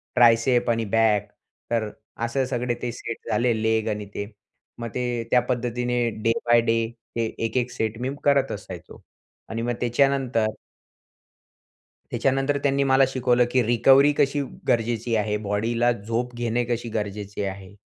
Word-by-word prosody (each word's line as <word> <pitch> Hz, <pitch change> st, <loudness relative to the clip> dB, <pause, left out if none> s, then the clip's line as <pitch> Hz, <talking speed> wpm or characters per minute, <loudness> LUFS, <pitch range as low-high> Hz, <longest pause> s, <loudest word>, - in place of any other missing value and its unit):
Tricep 120 Hz, +1 st, +4 dB
आणि 115 Hz, -1 st, 0 dB
back. 110 Hz, -3 st, +3 dB, 0.4 s
तर 115 Hz, -2 st, 0 dB, 0.4 s
असे 130 Hz, +3 st, 0 dB
सगळे 125 Hz, -1 st, -1 dB
ते 120 Hz, -, -2 dB
सेट 115 Hz, 0 st, -7 dB
झाले, 120 Hz, 0 st, +2 dB
लेग 110 Hz, 0 st, +1 dB
आणि 105 Hz, -1 st, -3 dB
ते 100 Hz, -, -3 dB, 0.5 s
मग 115 Hz, 0 st, -4 dB
ते 120 Hz, -2 st, -1 dB
त्या 125 Hz, -, +5 dB
पद्धतीने 125 Hz, 0 st, -1 dB, 0.2 s
डे 115 Hz, -, +3 dB
बाय 120 Hz, 0 st, +5 dB
डे 115 Hz, 0 st, +1 dB, 0.4 s
हे 115 Hz, -, +1 dB
एक, 115 Hz, +2 st, -2 dB
एक 125 Hz, 0 st, 0 dB
सेट 110 Hz, -2 st, -2 dB
मी 130 Hz, -, -1 dB
करत 140 Hz, -1 st, +3 dB
असायचो -, -, -9 dB, 0.5 s
आणि 115 Hz, +1 st, -3 dB
मग 120 Hz, +1 st, -1 dB
त्याच्यानंतर 125 Hz, -2 st, +2 dB, 1.6 s
त्याच्यानंतर 135 Hz, +1 st, +1 dB
त्यांनी 140 Hz, -1 st, +2 dB
मला 135 Hz, 0 st, +4 dB
शिकवलं 125 Hz, -2 st, +2 dB
की 125 Hz, -1 st, +3 dB
रिकव्हरी 135 Hz, +5 st, +5 dB
कशी 145 Hz, +1 st, +2 dB, 0.3 s
गरजेची 115 Hz, 0 st, +1 dB
आहे, 105 Hz, -1 st, 0 dB
बॉडीला 110 Hz, +4 st, 0 dB
झोप 115 Hz, +3 st, -3 dB
घेणे 120 Hz, 0 st, 0 dB
कशी 120 Hz, 0 st, -3 dB
गरजेची 105 Hz, -1 st, -4 dB
आहे. 95 Hz, 0 st, -6 dB
120 Hz, 150 wpm, -24 LUFS, 115-125 Hz, 1.6 s, त्या